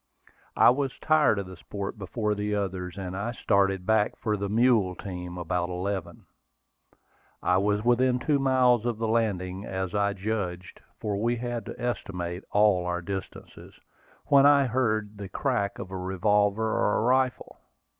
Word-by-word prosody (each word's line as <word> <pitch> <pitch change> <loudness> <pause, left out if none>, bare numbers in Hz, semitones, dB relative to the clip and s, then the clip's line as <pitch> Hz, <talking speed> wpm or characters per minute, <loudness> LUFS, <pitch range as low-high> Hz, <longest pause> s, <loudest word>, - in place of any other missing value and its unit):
I - - +7
was 135 0 -2
tired 155 -8 +3
of 100 - -3
the 95 0 -10
sport 100 +3 -6
before 105 +2 -2
the 105 0 -2
others, 95 -3 -3
and 95 -1 -5
I 105 +5 -3
started 95 -4 +1
back 110 0 +2
for 110 -2 -1
the 100 -1 -3
mule 110 -4 +3
team 90 -1 -7
about 90 0 -2
eleven. 90 -1 -4 1.2
I 90 - +3
was 105 +2 +1
within 125 +1 +3
two 145 +3 +1
miles 130 -3 +3
of 120 -2 -1
the 115 0 -2
landing, 100 -5 -1
as 95 -2 -4
I 100 -1 +1
judged, 95 -3 -4 0.2
for 105 -2 -2
we 120 +4 0
had 120 -2 -4
to - - -8
estimate 95 -7 -4
all 105 -4 +3
our 90 0 -2
distances, 95 +1 -8 0.5
when 140 0 +6
I 140 -1 +5
heard 110 -4 -1
the 100 -2 -6
crack 110 -2 -1
of 95 - -8
a 95 - -4
revolver 100 +3 +1
or 110 -1 +1
a - - 0
rifle. 130 +2 0
105 Hz, 165 wpm, -27 LUFS, 95-120 Hz, 1.2 s, I